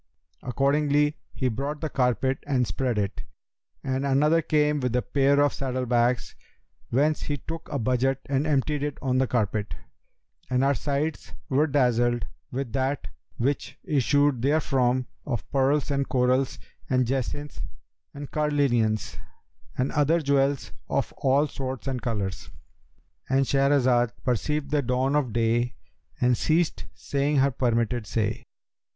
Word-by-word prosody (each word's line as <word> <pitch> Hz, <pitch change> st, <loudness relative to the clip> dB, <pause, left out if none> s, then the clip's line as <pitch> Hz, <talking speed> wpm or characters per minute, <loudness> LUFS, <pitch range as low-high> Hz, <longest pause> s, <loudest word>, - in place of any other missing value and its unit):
Accordingly 145 Hz, +3 st, +2 dB, 0.2 s
he 130 Hz, -, -1 dB
brought 140 Hz, +6 st, -3 dB
the 160 Hz, -, -2 dB
carpet 130 Hz, -1 st, +1 dB
and 130 Hz, -3 st, +2 dB
spread 125 Hz, -2 st, -1 dB
it, 100 Hz, -2 st, -2 dB, 0.6 s
and 130 Hz, 0 st, -1 dB
another 150 Hz, +4 st, +3 dB
came 150 Hz, -1 st, +2 dB
with 125 Hz, -2 st, -1 dB
a 125 Hz, -, +1 dB
pair 140 Hz, 0 st, +2 dB
of 145 Hz, -1 st, +3 dB
saddle 130 Hz, -2 st, -2 dB
bags, 120 Hz, 0 st, +1 dB, 0.6 s
whence 150 Hz, +5 st, +2 dB
he 145 Hz, -, -2 dB
took 165 Hz, +4 st, -7 dB
a 145 Hz, -, -1 dB
budget 130 Hz, +2 st, +1 dB
and 140 Hz, +2 st, 0 dB
emptied 145 Hz, 0 st, +1 dB
it 145 Hz, -1 st, -3 dB
on 130 Hz, -1 st, +1 dB
the 130 Hz, -, +2 dB
carpet; 105 Hz, -3 st, -1 dB, 0.7 s
and 125 Hz, +1 st, +2 dB
our 140 Hz, +1 st, +4 dB
sights 145 Hz, +3 st, -2 dB, 0.2 s
were 145 Hz, +4 st, +3 dB
dazzled 120 Hz, -4 st, +2 dB, 0.3 s
with 130 Hz, -2 st, -4 dB
that 135 Hz, +1 st, -1 dB, 0.3 s
which 135 Hz, +4 st, -1 dB
issued 145 Hz, -2 st, +2 dB
therefrom 130 Hz, -3 st, +2 dB, 0.2 s
of 120 Hz, -5 st, -3 dB
pearls 140 Hz, +2 st, +2 dB
and 140 Hz, -1 st, -1 dB
corals 130 Hz, +1 st, +1 dB, 0.3 s
and 130 Hz, -1 st, +2 dB
jacinths 135 Hz, +3 st, -3 dB, 0.5 s
and 145 Hz, 0 st, -8 dB
carnelians 135 Hz, -8 st, +1 dB, 0.6 s
and 130 Hz, +1 st, 0 dB
other 150 Hz, +3 st, +3 dB
jewels 140 Hz, -2 st, +1 dB, 0.2 s
of -, -, -1 dB
all 140 Hz, +3 st, +3 dB
sorts 130 Hz, -2 st, -5 dB
and 130 Hz, -3 st, -2 dB
colours."—And 115 Hz, +5 st, -4 dB
Shahrazad 130 Hz, -4 st, +3 dB
perceived 140 Hz, +3 st, -1 dB
the 150 Hz, -1 st, +2 dB
dawn 130 Hz, +2 st, 0 dB
of 140 Hz, -5 st, +1 dB
day 120 Hz, +2 st, +1 dB, 0.4 s
and 125 Hz, 0 st, +3 dB
ceased 155 Hz, -, 0 dB
saying 140 Hz, +8 st, 0 dB
her 140 Hz, +1 st, +4 dB
permitted 120 Hz, -2 st, 0 dB
say. 110 Hz, -2 st, -2 dB
135 Hz, 135 wpm, -26 LUFS, 125-145 Hz, 0.7 s, our